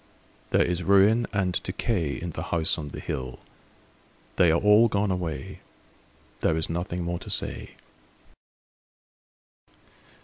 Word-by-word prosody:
There - - +3
is 90 0 -1
ruin 100 +5 +4
and 95 -3 0
decay 90 -5 -2
In 85 0 -5
the 80 - -6
House 80 0 0
on 75 - -5
the 70 - -8
Hill 65 -1 -5 1.0
They 90 - +5
are 85 - +3
all 105 +3 +6
gone 105 -2 0
away, 80 -7 -4 0.8
There 80 - +1
is 80 0 -2
nothing 85 +1 -3
more 85 0 -3
to - - -10
say. - - -2
90 Hz, 130 wpm, -26 LUFS, 80-100 Hz, 1.0 s, all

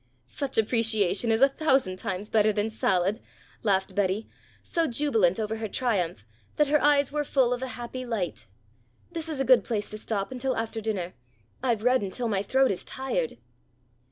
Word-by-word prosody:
"Such 270 - -3
appreciation 225 -1 +2
is 225 +2 +2
a 275 - +8
thousand 270 -10 +1
times 195 +2 -3
better 215 -1 +3
than 210 +1 -1
salad," 195 0 +1 0.4
laughed 195 -2 +1
Betty, 200 +2 0 0.4
so 335 -1 0
jubilant 225 - +2
over 220 0 -2
her 220 0 -3
triumph 190 - -1 0.3
that 295 -2 +2
her 300 0 +3
eyes 285 -1 +4
were 295 0 0
full 260 -3 +2
of 245 - -4
a 260 - -2
happy 245 +1 -5
light. 200 - -3 0.6
"This 330 -2 -4
is 300 -4 -4
a 270 - +1
good 255 -1 +6
place 215 -4 -2
to 215 - -6
stop 210 0 -3
until 260 0 -2
after 225 0 -3
dinner. 195 -5 -3 0.5
I've 235 -4 0
read 250 +1 +4
until 205 +5 -3
my 200 -3 0
throat 265 +4 +2
is 185 - -4
tired." 240 - -3
225 Hz, 180 wpm, -27 LUFS, 200-260 Hz, 0.6 s, a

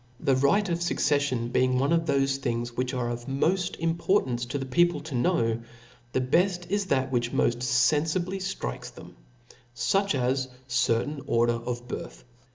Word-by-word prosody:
The 135 - +2
right 140 +11 +3
of 170 -1 -1
fucceflion 140 -8 0
being 130 0 +3
one 140 +5 +2
of 165 -1 +2
thofe 135 -2 +1
things 120 -2 -3
which 125 0 -1
are 125 -2 -2
of 120 +1 -5
mofl: 175 +7 0
importance 165 -7 0
to 145 - -3
the 135 - -4
people 175 +6 +2
to 155 -1 -8
know, 115 -2 +1 0.5
the 130 - 0
befl: 175 +7 +1
is 205 0 +1
that 135 -4 0
which 120 -1 0
moft 120 0 +1
fen 130 +4 +3
fibly 185 +4 -2
fl;rikes 185 - -4
them, - - -12 0.6
fuch 195 +8 +1
as 130 0 0
a - - -21 0.2
certain 125 +4 0
order 120 0 +3
of 120 +1 -5
birth. - - -7
135 Hz, 170 wpm, -27 LUFS, 120-165 Hz, 0.6 s, right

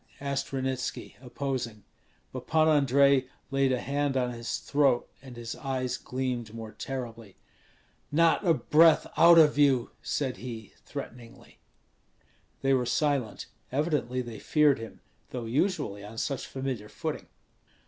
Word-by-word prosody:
asked 140 -1 -3
Ranitski, 130 -1 -3
opposing. 125 -5 -4 0.5
But 130 -1 -7
Pan 160 0 +3
Andrei 140 -2 +4 0.2
laid 135 -1 +2
a 125 - +1
hand 140 0 -1
on 125 -1 0
his 115 -1 -4
throat, 140 -4 +2
and 130 -2 -11
his 115 -1 -6
eyes 130 -2 -2
gleamed 125 -4 -4
more 110 -1 -7
terribly. 115 -6 -7 0.7
"Not 165 +5 +3
a 175 - +4
breath 160 +1 +5
out 170 0 +7
of 150 -2 +6
you!" 135 -4 +3
said 135 -4 -2
he, 115 -4 -8
threateningly. 120 -1 -9 1.0
They 135 0 +3
were 125 -2 +1
silent; 140 -3 0 0.3
evidently 135 -3 0
they 115 -3 -8
feared 150 -4 +3
him, 115 -1 -9 0.3
though 125 -2 -5
usually 115 - -1
on 105 +2 -10
such 135 +2 -2
familiar 130 -6 -4
footing. - - -5
130 Hz, 135 wpm, -28 LUFS, 120-140 Hz, 1.0 s, out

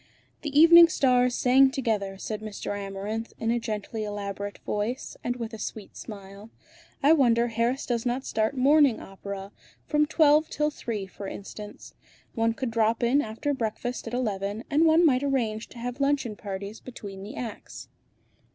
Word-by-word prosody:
"The 290 -1 +1
evening 335 +1 +10
stars 250 -5 +2
sang 265 +2 +5
together!" 215 -7 -2
said 215 +2 -5
Mr. 215 -2 -5
Amarinth, 205 +3 -5
in 225 0 0
a 240 - +1
gently 220 -1 -4
elaborate 205 -1 -5
voice, 215 +5 -3
and 245 - -1
with 230 -2 -6
a 220 - -7
sweet 210 -2 -7
smile. 200 0 -10 0.5
"I 295 +3 +7
wonder 240 -5 +3
Harris 235 +4 0
does 235 -2 -1
not 250 +2 -2
start 220 +5 -1
morning 280 -1 +5
opera; 195 0 -8 0.3
from 300 -1 +2
twelve 310 0 +4
till 300 0 0
three 220 -8 -4
for 195 +1 -9
instance. 205 +2 -9 0.4
One 225 -1 +1
could 255 -2 -3
drop 225 +1 +1
in 255 +5 +3
after 230 +5 -3
breakfast 240 0 -3
at 235 - -3
eleven, 205 -2 -2
and 310 +3 +4
one 325 +2 +5
might 260 -5 +4
arrange 235 -6 -1
to - - -14
have 245 +3 -5
luncheon 275 -6 +1
parties 200 +1 -6
between 200 -6 -9
the 210 +7 -8
acts." 230 -4 -7
230 Hz, 165 wpm, -27 LUFS, 210-265 Hz, 0.5 s, evening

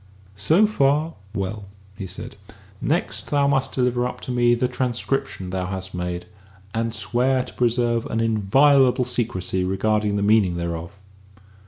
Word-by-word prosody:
"So 160 - +4
far, 155 -5 +1 0.2
well," 100 +1 -3 0.3
he 95 -2 -6
said; 105 +5 -8 0.5
"next 165 +5 -1
thou 145 -1 +2
must 135 -2 +1
deliver 125 -1 +1
up - - -7
to - - -5
me 120 -1 +3
the 125 +1 +1
transcription 125 -6 -2
thou 95 -1 -2
hast 95 0 -5
made, 90 0 -4 0.5
and 115 0 -1
swear 120 +5 +1
to - - -12
preserve 120 -1 +1
an 115 - -2
inviolable 125 +4 +4
secrecy 110 -7 -2
regarding 105 +2 0
the 100 - 0
meaning 100 -4 +3
thereof." 85 0 -4
115 Hz, 145 wpm, -23 LUFS, 95-125 Hz, 0.5 s, So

